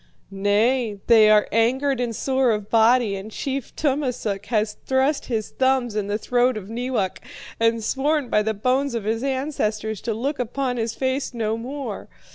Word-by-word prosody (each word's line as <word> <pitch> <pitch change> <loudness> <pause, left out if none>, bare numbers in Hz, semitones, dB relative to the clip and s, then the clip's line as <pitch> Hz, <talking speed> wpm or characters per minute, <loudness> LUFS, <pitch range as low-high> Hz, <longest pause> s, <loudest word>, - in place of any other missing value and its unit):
"'Nay, 210 +3 +1
they 220 -2 +6
are 210 -1 +5
angered 260 +4 +2
and 240 -2 -2
sore 265 +1 +1
of 210 -2 -2
body, 230 -1 +4
and 195 +2 -7
Chief 270 +3 -4
Tummasook 250 -9 -1
has 215 -2 0
thrust 270 +2 +1
his 220 -4 -2
thumbs 260 -4 +1
in 210 -2 -1
the 205 +1 -1
throat 245 +1 +1
of 205 0 -8
Neewak, 240 -5 -2 0.4
and 230 0 +2
sworn 280 +4 0
by 210 - +2
the 220 +1 -1
bones 255 +4 0
of 230 - -2
his 225 +2 -1
ancestors 220 -6 -2
to 225 -3 -2
look 275 +6 -2
upon 250 +1 -2
his 225 -1 -2
face 260 0 -2
no 220 -1 -1
more. 265 +5 -6
235 Hz, 170 wpm, -23 LUFS, 215-265 Hz, 0.4 s, they